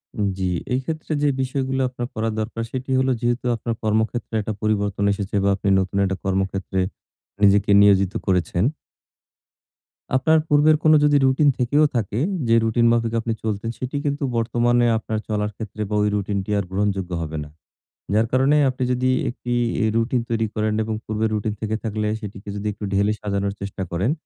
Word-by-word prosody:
উম 105 -2 0
জি। 95 - -2 0.3
এইক্ষেত্রে 155 +5 -3
যে - - +4
বিষয়গুলো 130 0 -1
আপনার 125 -1 -5
করা 110 +1 -1
দরকার, 115 +1 -3
সেটি 130 0 -4
হলো 130 0 +2
যেহেতু 120 +1 0
আপনার 115 +1 -3
কর্মক্ষেত্রে 110 +2 -1
একটা 110 +1 -3
পরিবর্তন 100 -2 0
এসেছে 100 0 -4
বা, 100 - +3
আপনি 100 - -2
নতুন 95 +1 -2
একটা 95 0 -1
কর্মক্ষেত্রে 95 0 -1 0.6
নিজেকে 100 +1 +4
নিয়োজিত 100 -1 +4
করেছেন 90 -1 +1 1.5
আপনার 160 +5 +4
পূর্বের 150 +1 +5
কোন 155 0 +6
যদি 145 -1 +5
রুটিন 135 +2 +4
থেকেও 145 +5 +3
থাকে 110 -1 -1 0.3
যে, 115 - +4
রুটিন 115 +1 +2
মাফিক 115 -1 +1
আপনি 115 0 -2
চলতেন, 110 0 -2
সেটি 130 +2 -4
কিন্তু 140 0 -1
বর্তমানে 120 +1 +2
আপনার 110 -1 -3
চলার 105 -1 -1
ক্ষেত্রে 110 -1 -7
বা, 105 - -1
ওই 105 - +2
রুটিনটি 100 -1 -2
আর 100 - 0
গ্রহণযোগ্য 95 -2 -1
হবে 80 -1 -4
না। 75 - -11 0.6
যার 110 +2 +3
কারণে 135 +3 +3
আপনি 130 0 -3
যদি 125 +1 +1 0.2
একটি 120 0 -4 0.3
এ - - +3
রুটিন 115 +2 +1
তৈরি 115 -1 0
করেন 110 0 0
এবং 110 0 -3
পূর্বের 110 +1 -1
রুটিন 105 0 -1
থেকে 110 0 -1
থাকলে 110 -1 -2
সেটিকে 100 -1 -8
যদি 105 +1 -4
একটু 105 - -11
ঢেলে 100 +2 +2
সাজানোর 100 -1 -1
চেষ্টা 100 -1 -4
করেন 95 +10 0
110 Hz, 175 wpm, -22 LUFS, 100-125 Hz, 1.5 s, কোন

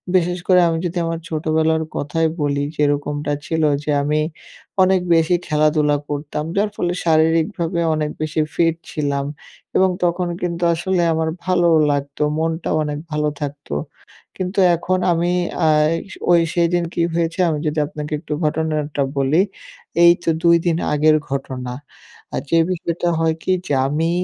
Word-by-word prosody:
বিশেষ 180 0 +2
করে 180 -1 +6
আমি 165 0 0
যদি 175 +1 -3
আমার 165 0 -2
ছোটবেলার 160 0 +1
কথাই 160 +3 0
বলি, 140 -1 0
যেরকমটা 145 0 0
ছিল 160 -1 -1 0.2
যে 150 - -5
আমি 150 +1 +1 0.6
অনেক 185 -1 +3
বেশি 165 +2 +3
খেলাধুলা 150 -1 +2
করতাম। 150 +1 -3
যার 205 +1 +2
ফলে 175 0 -1
শারীরিকভাবে 165 +2 +2 0.2
অনেক 150 -1 -1
বেশি 155 0 -2
ফিট 165 -1 +2 0.2
ছিলাম 140 -2 -1 0.5
এবং 190 0 +4
তখন 175 +1 +1
কিন্তু 175 -1 -2
আসলে 180 +2 0
আমার 160 0 0 0.2
ভালোও 175 -3 +3
লাগতো। 140 +1 -2
মনটাও 160 0 -1
অনেক 150 0 -3
ভালো 150 0 0
থাকত। 145 0 -5 0.7
কিন্তু 185 +2 -2 0.2
এখন 185 +2 -1
আমি 170 +1 +1 0.4
আ - - +5 0.3
এস 185 - -7 0.2
ওই 170 - +6
সেদিন 175 0 +2
কি 170 - -1
হয়েছে 170 +1 -1
আমি 150 -2 -1
যদি 150 +1 -1
আপনাকে 150 0 -6
একটু 150 -1 -5
ঘটনাটা 150 -2 -1 0.2
বলি। 140 +6 +3 0.6
এই 170 - +9
তো - - 0
২ 170 0 +6
দিন 165 -1 +2 0.2
আগের 155 +1 +4
ঘটনা। 130 -2 -4 0.6
আ - - -2
যে 165 - +3
বিষয়টা 175 -1 -1
হয় 160 -1 +1
কি 185 - 0 0.2
যে 145 - -1
আমি 160 +4 0
160 Hz, 155 wpm, -20 LUFS, 150-170 Hz, 0.7 s, এই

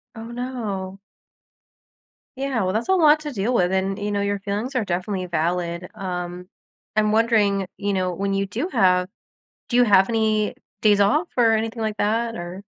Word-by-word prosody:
Oh 225 - -7
no. 210 -6 -5 1.4
Yeah, 265 -6 -1
well, 185 - 0
that's 220 - -1
a 380 - +3
lot 310 -4 +5
to 295 -1 -5
deal 225 +2 -1
with, 180 -5 +2
and, 195 +1 0
you 205 0 -2
know, 200 0 0
your 200 0 -1
feelings 205 +7 -3
are 225 -4 +1
definitely 185 +1 -2
valid. 170 +1 -2
Um, 180 -1 -5 0.5
I'm 215 -1 +3
wondering, 210 -4 +2
you 205 0 -2
know, 185 -2 0
when 195 +2 -2
you 195 0 0
do 245 - -3
have 185 - +3 0.6
do 240 - 0
you 245 - +6
have 195 -2 +5
any 215 -2 +1 0.3
days 205 -2 +4
off 300 - +3
or 230 -2 +4
anything 225 +1 -1
like 215 -1 -2
that? 230 +2 0
Or 175 +3 -7
205 Hz, 180 wpm, -23 LUFS, 190-230 Hz, 1.4 s, you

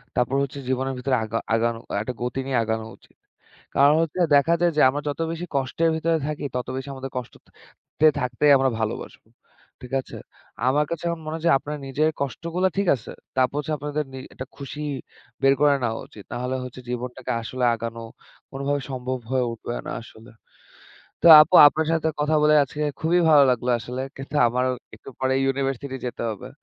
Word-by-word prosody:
তারপর 125 +2 +1
হচ্ছে 140 +1 -5
জীবনের 130 +1 -1
ভিতরে 130 +1 0
আগা 110 +1 -3 0.2
আগানো 115 0 0 0.2
একটা 125 +3 -4
গতি 125 +2 -2
নিয়ে 130 -2 0
আগানো 110 0 -2
উচিত। - - -26 0.6
কারণ 140 +2 +6
হচ্ছে 165 +2 -3 0.2
দেখা 150 +4 +4
যায় 175 -1 +3
যে - - +5
আমরা 145 +2 -3
যত 145 - -5
বেশি 170 +2 -5
কষ্টের 140 +5 +1
ভিতরে 165 +1 +1
থাকি 150 -1 -4
ততো 125 - -3
বেশি 135 +1 -6
আমাদের 135 0 -7
কষ্টত 125 -2 -8 0.6
তে 155 - +8
থাকতেই 130 +3 +2
আমরা 135 0 +2
ভালোবাসবো। 110 -1 -5 0.5
ঠিক 125 +1 -10
আছে? - - -11 0.5
আমার 145 +3 +3
কাছে 170 0 -4
এখন 170 -1 -4
মনে 155 +1 -4
হচ্ছে 170 +1 +1
আপনার 150 0 -6
নিজের 150 +4 +1
কষ্টগুলা 170 +8 -1
ঠিক 200 -2 +1
আছে। 110 - -10 0.3
তারপর 130 +1 +2
হচ্ছে 155 +1 -3
আপনাদের 150 +1 -3
নি - - -7 0.2
একটা 130 - -7
খুশি 140 +1 -7 0.6
বের 135 0 +5
করে 145 -1 +5
নেওয়া 115 -1 -1
উচিত। 105 - -13
না 120 - -3
হলে 130 +1 -2
হচ্ছে 125 0 -9
জীবনটাকে 125 +1 -4
আসলে 125 +2 -2
আগানো 115 0 -6 0.5
কোনভাবে 140 +1 -2
সম্ভব 130 0 -3
হয়ে 130 -2 +2
উঠবে 120 +1 -6
না - - -4
আসলে। 115 +1 -15 0.9
তো - - +3
আপু 155 - +4
আপনার 160 +2 -2
সাথে 160 -1 +1
কথা 155 +1 +2
বলে 150 0 +5
আজকে 150 +3 -6 0.2
খুবই 175 +2 +2
ভালো 150 -2 +7
লাগলো 125 0 0
আসলে। 125 +3 -5
কিন্তু 135 +2 -9
আমারও 125 +2 0 0.2
একটু - - -15
পরে 130 0 +1
ইউনিভার্সিটি 135 0 -2
যেতে 120 - -5
হবে। 105 - -7
135 Hz, 185 wpm, -24 LUFS, 125-150 Hz, 0.9 s, তে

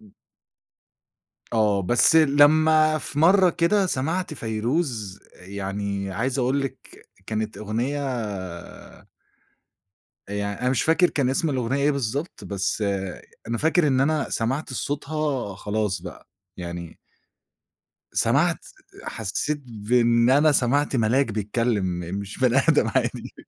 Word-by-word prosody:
إمم. 105 -2 -19 1.4
آه، 105 -3 +2
بس 120 - +4
لمّا 155 +1 +5
في 145 - -6
مرّة 185 +3 +5
كده 185 +4 +2
سمَعت 165 +3 -2
فيروز 115 - -2
يعني 100 +1 -4
عايز 125 +7 -2
أقول 130 +2 +1
لِك 135 -1 -8 0.2
كانت 110 0 -3
أغنية 115 +7 -2 2.3
يعني 100 0 -3
أنا 125 +1 +1
مش 130 - +1
فاكر 165 +3 +3
كان 135 -3 0
اسم 155 +4 0
الأغنية 130 +1 -1
إيه 145 - +4
بالضبط، 140 +4 -3
بس 100 +2 -2 0.7
أنا 115 - -1
فاكر 160 +3 +2
إن 130 -2 +2
أنا 150 +1 +1
سمَعت 130 +5 -2
صوتها 145 -5 -3
خلاص 105 -3 -2
بقى، 90 - -10 0.3
يعني 85 -1 -7 1.2
سمَعت - - +1 0.4
حسيت 145 +8 -3
بإن 115 +1 +2
أنا 150 +3 +5
سمَعت 140 +2 +1
ملاك 125 +4 +2
بيتكلم، 110 0 -1 0.4
مش 100 0 -8
بني 130 0 +3
آدم - - +4
عادي. - - -2
125 Hz, 115 wpm, -24 LUFS, 105-145 Hz, 2.3 s, لمّا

